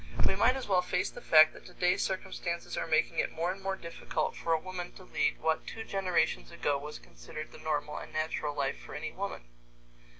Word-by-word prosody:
We - - +4
might 230 +6 +5
as 265 - -4
well 185 -3 +4
face 180 0 0
the 245 - -9
fact 155 -4 +8
that - - -13
today 180 0 +2
circumstances 185 -2 -2
are - - -1
making 155 -1 +2
it - - +1
more 170 +3 0
and 195 +1 -7
more 195 0 -1
difficult 170 -3 -3
for 165 - -2
a 160 - +4
woman 180 0 -6
to 185 - -12
lead - - 0
what 160 0 0
two 225 - -5
generations 180 - +1
ago 145 - 0
was 150 +1 -6
considered - - -9
the - - -12
normal 150 -1 -1
and - - -9
natural 155 -1 -1
life 135 -2 -1
for - - -9
any 150 +2 -3
woman. 200 - -4
170 Hz, 210 wpm, -31 LUFS, 155-185 Hz, -, fact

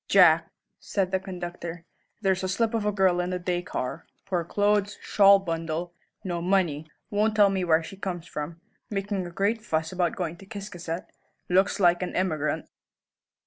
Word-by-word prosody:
"Jack," 170 -4 +6 0.3
said 190 -2 -1
the 190 - +2
conductor, 175 -2 -6 0.4
"there's 190 -2 +1
a 185 - -1
slip 225 +4 +1
of 220 -2 0
a - - +3
girl 190 -3 +3
in 180 0 -1
the 185 - -1
day 175 0 -1
car 125 -7 -4 0.2
poor 175 -3 0
clothes, 205 +3 +1
shawl 200 -1 +6
bundle, 165 -2 -3 0.3
no 175 -2 -2
money, 170 -5 +1 0.2
won't 210 +1 +2
tell 205 -2 +6
where 170 -4 +2
she 195 - -9
comes 180 -4 -4
from, 150 +3 -6 0.3
making 195 -2 -2
a - - -7
great 205 +5 0
fuss 160 -6 -1
about 180 -2 0
going 170 -2 -3
to 195 - -14
Ciscasset, 185 -5 -6 0.4
looks 190 +3 +3
like 175 -2 +4
an 180 - -3
emigrant." 155 -5 0
185 Hz, 170 wpm, -27 LUFS, 170-195 Hz, 0.4 s, Jack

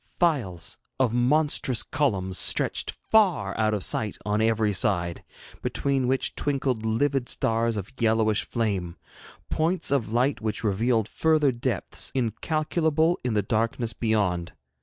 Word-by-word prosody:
Files 120 - 0 0.2
of 125 -4 +2
monstrous 130 -1 +2
columns 100 -11 -1
stretched - - +2 0.2
far 180 - +3
out 110 -1 +1
of 100 - -3
sight 105 -2 -1
on 105 +1 0
every 110 -2 +2
side, 90 -3 0 0.4
between 135 -2 0
which 130 +1 0
twinkled 135 -5 -1
livid 125 +4 0
stars 115 0 +1
of 105 +6 -6
yellowish 110 -2 +2
flame; 100 -7 -2 0.5
points 165 +2 0
of 125 -7 0
light 125 +1 +1
which 110 0 -3
revealed 110 +2 +1
further 155 +1 +2
depths 120 - -2
incalculable 155 - 0
in 125 -3 -1
the 105 - +2
darkness 115 +2 -1
beyond. 100 -6 -1
115 Hz, 130 wpm, -26 LUFS, 105-140 Hz, 0.5 s, far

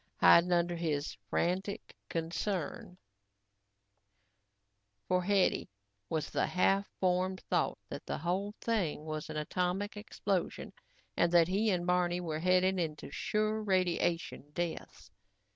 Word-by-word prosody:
Hiding 175 +1 +6
under 175 0 +2
his 155 -3 -2
frantic 190 +3 -1
concern 180 +4 -3 2.1
for 180 0 +2
Hetty 195 0 +2 0.4
was 155 -2 -2
the - - +1
half 195 +2 +2
formed 185 0 +1
thought - - +1
that - - -7
the - - -2
whole 190 +6 -2
thing 185 -10 -1
was 155 0 -4
an 155 - -4
atomic 180 +6 -1
explosion 200 -3 -3 0.4
and 170 - +3
that 170 -2 +6
he 210 +4 +2
and 180 -3 0
Barney 180 0 +2
were 160 -3 -3
heading 185 +2 +3
into 155 -3 -3
sure 215 +1 0
radiation 175 -6 0
deaths. 170 - -5
180 Hz, 120 wpm, -32 LUFS, 170-195 Hz, 2.1 s, Hiding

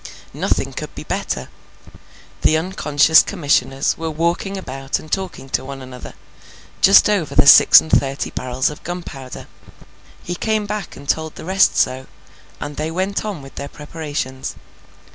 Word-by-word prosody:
Nothing - - -1
could - - -7
be - - -7
better. 65 - -3 0.9
The 155 - +3
unconscious 160 -3 +4
Commissioners 140 -6 0
were 165 0 -3
walking 170 +5 -1
about 135 -6 -4
and 155 - -13
talking 185 -8 -3
to - - -1
one 135 +1 -7
another, 130 -1 -10 0.7
just 195 - +7
over 200 -7 0
the - - +5
six - - +9
and 160 - -7
thirty 135 0 0
barrels 130 +2 -1
of 150 - -12
gunpowder. 160 -7 -7 0.8
He 175 - -4
came 215 +3 -1
back 210 -3 -5
and 140 - -12
told 160 +1 -1
the - - -9
rest 190 +2 +3
so, 130 +1 0 0.5
and 145 0 -6
they 155 +1 -2
went 190 +4 -2
on 200 -9 -5
with 135 - -12
their 140 0 -6
preparations. 145 -3 -5
155 Hz, 155 wpm, -19 LUFS, 135-180 Hz, 0.9 s, six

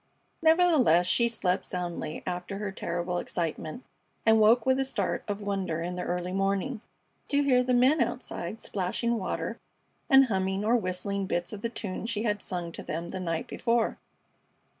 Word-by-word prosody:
Nevertheless, 320 - +5
she 235 +6 +3
slept 190 -5 0
soundly 175 -3 -4
after 180 +2 -4
her 205 -1 -3
terrible 175 -1 -2
excitement, 165 - -3 0.4
and 220 0 +6
woke 220 +2 +5
with 260 0 +3
a - - +3
start 265 - -2
of 205 0 -3
wonder 190 -5 -2
in 180 +1 -3
the 180 - -3
early 180 0 -2
morning, 195 +5 0 0.5
to 285 0 +3
hear 255 -3 +4
the 250 0 -1
men 260 +4 +4
outside 230 -4 -3
splashing 220 +5 -1
water 185 - -3 0.5
and 270 0 +8
humming 190 -2 -1
or 230 +3 +4
whistling 195 -1 -1
bits 175 +3 -2
of 205 - -7
the 230 - -1
tunes 220 -1 -5
she 215 -2 -2
had 210 -3 0
sung 175 -2 -4
to - - -7
them 170 +2 -4
the 190 - -5
night 165 -3 -2
before. 235 -1 0
200 Hz, 170 wpm, -28 LUFS, 180-235 Hz, 0.5 s, and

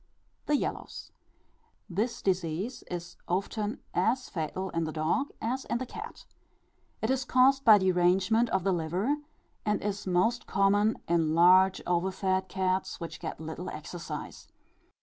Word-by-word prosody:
The 295 - +3
Yellows. - - -4 0.8
This 215 +6 -2
disease 185 +5 -1
is 175 0 -6
often 205 +4 -2
as 250 +3 +1
fatal 185 +2 -3
in 165 -1 -1
the 155 - -3
dog 160 - 0
as 255 +4 -2
in - - -1
the 255 - -4
cat. - - -9 0.8
It 220 - +2
is 265 0 +1
caused 265 +2 +4
by 215 -4 +8
derangement 190 +5 +3
of 190 -2 0
the 195 0 +2
liver, 180 - 0 0.5
and 210 -1 +1
is 205 -1 -3
most 185 +7 +1
common 205 +2 +3
in 165 -2 +2
large 185 +3 +5
overfed 190 +1 0
cats, 185 0 -1
which 170 - -7
get 165 - -6
little 160 +3 -6
exercise. 155 0 -7
190 Hz, 140 wpm, -29 LUFS, 175-220 Hz, 0.8 s, by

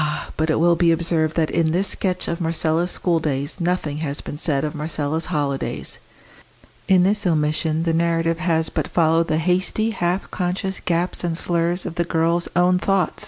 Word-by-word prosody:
but 160 +1 0
it 155 - +2
will 170 +1 +4
be 170 0 +3
observed 165 -1 +1
that 160 -2 +1
in 165 -1 +2
this 185 +5 +1
sketch 185 -2 -1
of 170 - -3
Marcella's 165 +1 0
schooldays 155 -4 -1
nothing 170 -4 -1
has 145 -2 -3
been - - -7
said 145 -2 0
of 150 0 -2
Marcella's 155 0 -2
holidays. 145 -5 -3 0.9
In 185 -2 +5
this 205 +3 +2
omission 155 0 +1
the 165 -1 0
narrative 165 0 +1
has 165 -3 +1
but - - -2
followed 165 0 +2
the 155 - +1
hasty, 185 +6 +1
half 180 -1 -2
conscious 185 +1 -2
gaps 175 +1 -1
and 170 -2 -1
slurs 170 +1 0
of 180 - -4
the - - +3
girl's 170 +1 +1
own 180 +1 +4
thought. 190 -3 0
165 Hz, 175 wpm, -21 LUFS, 160-180 Hz, 0.9 s, In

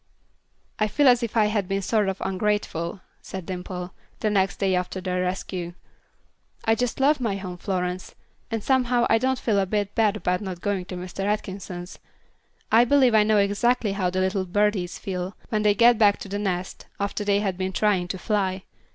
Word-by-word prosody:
"I 215 - +3
feel 285 +7 +3
as 245 -1 +6
if 235 -1 -3
I 215 - +5
had 210 -3 0
been 195 0 -1
sort 210 0 +1
of 190 - -3
ungrateful," 190 -3 -1 0.2
said 190 -3 -7
Dimple, 180 0 -6 0.3
the 215 - +1
next 195 -1 +1
day 195 -2 +1
after 180 +1 -1
their 180 -1 -2
rescue. 180 -1 -3 0.9
"I 225 - +4
just 245 +2 -1
love 285 +2 +4
my 225 -6 -1
home, 185 -2 -6
Florence, 180 -1 -3 0.3
and 225 -3 -3
somehow 250 -2 +2
I 225 - +5
don't 260 +1 +1
feel 215 -5 +1
a 195 - +1
bit 205 0 -1
bad 215 -2 +2
about 180 -2 -1
not 185 -4 -5
going 195 -1 -2
to 180 - -7
Mr. 180 +2 -5
Atkinson's. 190 -3 -4 0.7
I 230 +2 +7
believe 255 -1 +4
I 215 - +6
know 210 0 +3
exactly 205 +3 +2
how 195 -2 0
the 185 +1 -1
little 190 0 0
birdies 195 -1 0
feel 185 0 -4
when 215 -1 0
they 210 -1 +3
get 235 +1 +5
back 205 -2 +5
to - - -6
the 200 +1 -3
nest, 185 -2 -3
after 200 +1 -2
they 200 0 +2
have 195 -3 -1
been 185 0 -1
trying 190 -3 +1
to 190 - -4
fly. 190 -2 -1
200 Hz, 195 wpm, -25 LUFS, 185-215 Hz, 0.9 s, I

